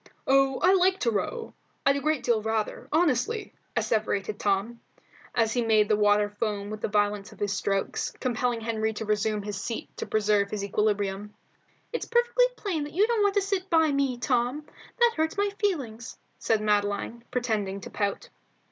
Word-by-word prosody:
"Oh, 270 0 +3
I 370 +2 +6
like 375 0 +4
to 235 - +2
row. 455 - -3 0.3
'I'd 275 0 +4
a - - -3
great 310 0 0
deal 235 -3 +2
rather. 220 0 -2
Honestly," 340 - +1 0.2
asseverated 215 -1 0
Tom, 205 +4 0 0.5
as 225 -2 +2
he 245 - +1
made 215 -2 +3
the 215 - +4
water 205 0 +3
foam 205 0 -3
with 215 0 -6
the - - 0
violence 205 0 0
of - - -15
his 205 -1 0
strokes, 195 0 -1
compelling 245 -1 -1
Henry 220 -1 -1
to 220 - -5
resume 210 0 0
his 200 -1 -4
seat 230 - -5
to - - -4
preserve 210 -2 +2
his 205 -1 -3
equilibrium. 205 0 -1 0.6
"It's 475 - -3
perfectly 480 +1 +3
plain 335 -8 -2
that 295 - -9
you 395 +5 +4
don't 460 -1 +1
want 405 0 +2
to 405 - +3
sit 390 -1 -2
by 320 -2 +4
me, 275 -3 0
Tom. 250 +4 0 0.3
That 475 -1 +4
hurts 320 +5 0
my 405 0 +1
feelings," 265 - -2 0.2
said 220 -1 +1
Madeline, 210 +2 0
pretending 215 -6 -1
to - - -9
pout. 200 -1 -2
225 Hz, 180 wpm, -27 LUFS, 210-310 Hz, 0.6 s, I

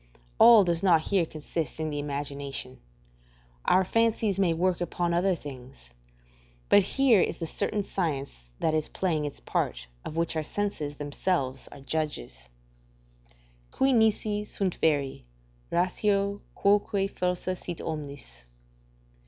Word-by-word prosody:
All 230 -3 +9
does 170 -2 0
not 175 -5 +5
here 185 -5 +2
consist 160 +1 -5
in 155 -1 -2
the 145 - -3
imagination; 140 -2 -5 0.9
our 185 +1 +4
fancies 225 -2 +1
may 185 -3 +3
work 180 +2 0
upon 175 0 -1
other 180 +2 +2
things: 130 - -11 0.8
but 205 - +7
here 235 +1 +4
is 170 - 0
the 165 - -4
certain 205 +5 -1
science 140 - -3
that 160 - +1
is 155 -1 0
playing 160 -5 -1
its 145 - -6
part, - - -2 0.2
of 155 - -7
which 165 0 0
our 160 - +1
senses 155 -4 -3
themselves 145 -2 -2
are 140 - -12
judges: 135 - -4 1.2
"Qui 265 0 +2
nisi 215 -2 +2
sunt 195 -3 -2
veri, 145 - +1 0.5
ratio 200 +3 +1 0.2
quoque 200 -1 +2
falsa 180 0 -1
sit 175 -2 -6
omnis." 145 - -7
170 Hz, 130 wpm, -28 LUFS, 145-195 Hz, 1.2 s, All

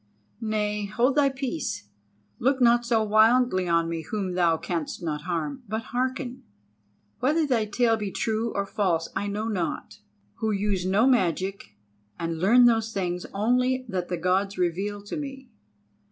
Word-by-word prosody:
Nay, 210 -1 -1
hold 235 +6 +2
thy 285 -1 +4
peace, 265 - -4 0.5
look 265 +2 +2
not 240 -1 +4
so 225 -2 +3
wildly 215 -2 +4
on 165 -1 +2
me 165 -1 -3
whom 190 +2 -3
thou 170 -2 +3
canst 170 0 -4
not 150 -3 -2
harm, 160 - -2
but 220 +2 -2
hearken. 255 0 -2 0.8
Whether 305 +5 +2
thy 240 -6 +1
tale 225 +2 +2
be 210 -2 -3
true 220 +3 -1
or 200 -1 -1
false 190 -6 0
I 205 - -1
know 210 +2 -2
not, 185 -7 -3 0.4
who 220 - -1
use 200 -3 0
no 200 +5 +3
magic 190 - 0 0.4
and 165 -1 -3
learn 235 +8 +6
those 225 -2 +3
things 180 -3 -3
only 250 +5 +1
that 180 -4 -2
the 180 - -2
Gods 190 +3 0
reveal 195 +4 -1
to 205 - -5
me. 270 -3 -7
210 Hz, 155 wpm, -26 LUFS, 180-240 Hz, 0.8 s, learn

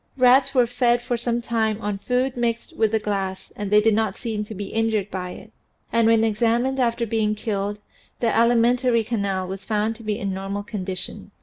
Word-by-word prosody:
Rats 260 +2 +5
were 250 -2 +5
fed 245 0 +2
for 245 0 -1
some 235 0 -2
time 220 -2 0
on 205 -2 -3
food 250 +4 0
mixed 235 -1 -2
with 220 -2 +2
the 220 - +3
glass 195 -3 -3
and 205 -1 -4
they 210 +1 +6
did 220 +1 +3
not 220 -2 0
seem 220 -3 -3
to 215 - -8
be 200 0 -5
injured 220 -3 0
by 180 -1 -4
it. - - -11 0.4
And 230 -1 +4
when 225 -1 +4
examined 235 +4 +1
after 235 -1 +1
being 215 -1 0
killed, 205 -1 -3 0.4
the 230 -2 +1
alimentary 235 +1 +3
canal 200 -5 -2
was 190 +1 -6
found 215 +2 0
to 230 - -12
be 210 -1 -1
in 200 -4 -3
normal 195 +1 -4
condition. 195 -1 -6
220 Hz, 200 wpm, -23 LUFS, 205-235 Hz, 0.4 s, they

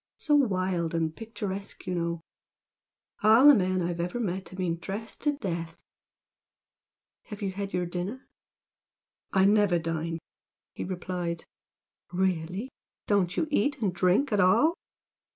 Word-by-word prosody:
So 300 - 0
wild 185 - +2
and 160 -1 0
picturesque 205 -3 -6
you 180 - -2
know! 170 -1 -2 1.0
All 225 +6 +7
the 295 - +11
men 185 -5 +2
I've 170 0 -2
ever 180 +7 -2
met 190 -4 -3
have 185 - -11
been 175 -3 -1
dressed 205 +6 -6
to 295 0 +2
death! 170 - -4 1.5
Have 210 -2 -8
you 195 - -1
had 200 +1 -4
your 180 -1 0
dinner?" 180 +9 -5 1.0
"I 190 0 +4
never 205 -3 +4
dine," 165 0 -2 0.6
he - - -5
replied. 175 -2 -3 0.7
"Really! 185 +3 -1 0.4
Don't 190 -3 +1
you 315 - +1
eat 285 +2 +1
and 200 -5 0
drink 185 +10 +2
at 205 - +2
all?" 195 - +5
185 Hz, 135 wpm, -28 LUFS, 175-210 Hz, 1.5 s, the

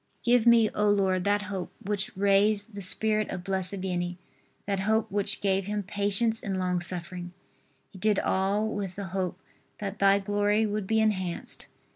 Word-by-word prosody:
Give 240 -1 +3
me, 230 -2 +6
O 210 0 +2
Lord, 190 -3 +1
that 205 0 +2
hope 195 -2 -5
which 200 -1 -3
raised 200 +2 +3
the 200 - -6
spirit 215 +3 +3
of 180 -2 -5
Blessed 190 0 -1
Vianney, 175 -1 -2 0.5
that 200 -1 -1
hope 220 +2 0
which 200 0 -1
gave 195 -1 +1
him 210 0 -2
patience 205 +3 +1
in 195 -2 -3
long 180 -1 -1
suffering. 175 0 -5 0.6
He 190 - -12
did 210 0 +2
all 195 +4 +1
with 200 -4 -4
the 195 -1 -6
hope 185 -1 -2 0.4
that 200 -1 -5
Thy 195 0 +5
glory 205 +2 +1
would 210 -2 -3
be 220 +1 +2
enhanced. 190 -5 -2
200 Hz, 170 wpm, -27 LUFS, 190-210 Hz, 0.6 s, me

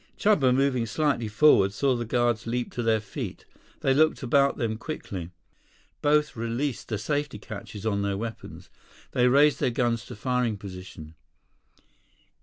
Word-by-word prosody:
Chuba, 155 -12 +3
moving 130 -2 +1
slightly 140 -4 0
forward, 105 -4 +4
saw 130 +6 +1
the 120 -1 -3
guards 120 -1 0
leap 120 +1 -2
to 120 - -3
their 115 -1 +2
feet. 105 - -7 0.4
They 135 - +3
looked 155 +1 +2
about 140 +2 +3
them 110 -2 -1
quickly. 100 - -6 0.7
Both 150 -1 +2
released 115 +4 -3
the 110 - -2
safety 145 +2 -2
catches 105 0 -9
on 100 -2 0
their 100 -1 -1
weapons. 115 +1 -7 0.4
They 125 0 +3
raised 145 +3 +4
their - - +2
guns 120 -1 0
to - - -8
firing 125 -1 -1
position. 90 -5 -10
120 Hz, 150 wpm, -26 LUFS, 105-140 Hz, 0.7 s, forward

